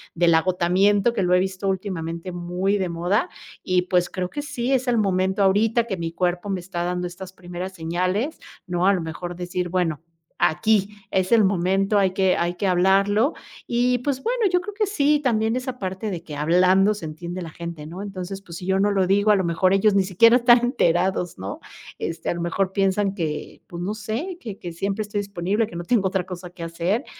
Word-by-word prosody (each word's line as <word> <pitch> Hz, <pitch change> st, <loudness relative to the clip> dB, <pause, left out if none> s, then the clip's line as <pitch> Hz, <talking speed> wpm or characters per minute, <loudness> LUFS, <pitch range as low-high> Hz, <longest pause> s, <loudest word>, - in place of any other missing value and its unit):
del 170 Hz, -1 st, +4 dB
agotamiento, 185 Hz, +5 st, +3 dB
que 200 Hz, -, 0 dB
lo 180 Hz, 0 st, +2 dB
he 180 Hz, -, +5 dB
visto 190 Hz, +1 st, -2 dB
últimamente 180 Hz, -2 st, -4 dB
muy 180 Hz, +3 st, -1 dB
de 190 Hz, -2 st, -1 dB
moda. 175 Hz, +5 st, 0 dB, 0.3 s
Y, 180 Hz, -1 st, +2 dB
pues, 180 Hz, -1 st, +1 dB
creo 180 Hz, -1 st, -3 dB
que 290 Hz, -, -4 dB
sí, 255 Hz, -3 st, -3 dB
es 260 Hz, -1 st, +1 dB
el 240 Hz, -, +2 dB
momento 190 Hz, 0 st, +1 dB
ahorita 220 Hz, +4 st, +3 dB
que 195 Hz, -, -3 dB
mi 165 Hz, -1 st, -3 dB
cuerpo 180 Hz, +3 st, -1 dB
me 190 Hz, -, -1 dB
está 175 Hz, -1 st, -4 dB
dando 180 Hz, 0 st, -2 dB
estas 185 Hz, +1 st, -9 dB
primeras 180 Hz, +1 st, -7 dB
señales, 185 Hz, -, -1 dB, 0.3 s
¿no?, 175 Hz, 0 st, 0 dB
a 200 Hz, -, +6 dB
lo 185 Hz, -, -1 dB
mejor, 170 Hz, +2 st, -6 dB
decir: 180 Hz, 0 st, -3 dB
"Bueno, 170 Hz, -4 st, -1 dB, 0.4 s
aquí 210 Hz, +4 st, +2 dB
es 190 Hz, -1 st, 0 dB
el 225 Hz, -3 st, +6 dB
momento, 195 Hz, +2 st, +1 dB
hay 190 Hz, -2 st, +2 dB
que 190 Hz, -1 st, +2 dB
hay 175 Hz, +1 st, -1 dB
que 195 Hz, +3 st, -1 dB
hablarlo". 195 Hz, -, +3 dB, 0.3 s
Y, 245 Hz, +1 st, +2 dB
pues, 265 Hz, 0 st, -2 dB
bueno, -, -, -1 dB
yo 360 Hz, -, +3 dB
creo 415 Hz, +3 st, -7 dB
que 425 Hz, +1 st, 0 dB
sí, 295 Hz, -6 st, +2 dB
también 225 Hz, -3 st, +1 dB
esa 255 Hz, 0 st, -4 dB
parte 190 Hz, +2 st, -4 dB
de 170 Hz, -2 st, -5 dB
que, 150 Hz, -, -8 dB
"Hablando 185 Hz, +6 st, +4 dB
se 205 Hz, -5 st, -8 dB
entiende 170 Hz, +4 st, -6 dB
la 165 Hz, -, -6 dB
gente", 170 Hz, -2 st, -7 dB
¿no?, 180 Hz, +4 st, -7 dB
entonces, 195 Hz, -1 st, -6 dB
pues, 170 Hz, -4 st, -9 dB
si 180 Hz, -, -8 dB
yo 190 Hz, 0 st, +2 dB
no 205 Hz, +1 st, +3 dB
lo 190 Hz, -2 st, +2 dB
digo, 205 Hz, +2 st, +3 dB
a -, -, +6 dB
lo 190 Hz, -, 0 dB
mejor, 170 Hz, +3 st, +2 dB
ellos 200 Hz, +1 st, +3 dB
ni 195 Hz, -, +4 dB
siquiera 215 Hz, +6 st, +5 dB
están 240 Hz, 0 st, +6 dB
enterados, 180 Hz, -6 st, +1 dB
¿no?, 95 Hz, +2 st, -5 dB, 0.4 s
este, 165 Hz, 0 st, -4 dB
a -, -, +1 dB
lo 170 Hz, -, -4 dB
mejor, 185 Hz, +3 st, -1 dB
piensan 195 Hz, 0 st, +1 dB
que, 155 Hz, -5 st, -4 dB
pues, 170 Hz, 0 st, -7 dB
no 200 Hz, +4 st, -2 dB
sé 225 Hz, -, -4 dB
que 215 Hz, -, -7 dB
que 175 Hz, -1 st, -7 dB
siempre 195 Hz, +5 st, -2 dB
estoy 205 Hz, 0 st, -3 dB
disponible, 200 Hz, +2 st, -1 dB
que -, -, -11 dB
no 175 Hz, -, -5 dB
tengo 205 Hz, -2 st, +2 dB
otra 190 Hz, -1 st, -1 dB
cosa 180 Hz, -1 st, -8 dB
que 175 Hz, -1 st, -10 dB
hacer, 170 Hz, -, -1 dB
190 Hz, 215 wpm, -23 LUFS, 175-205 Hz, 0.4 s, a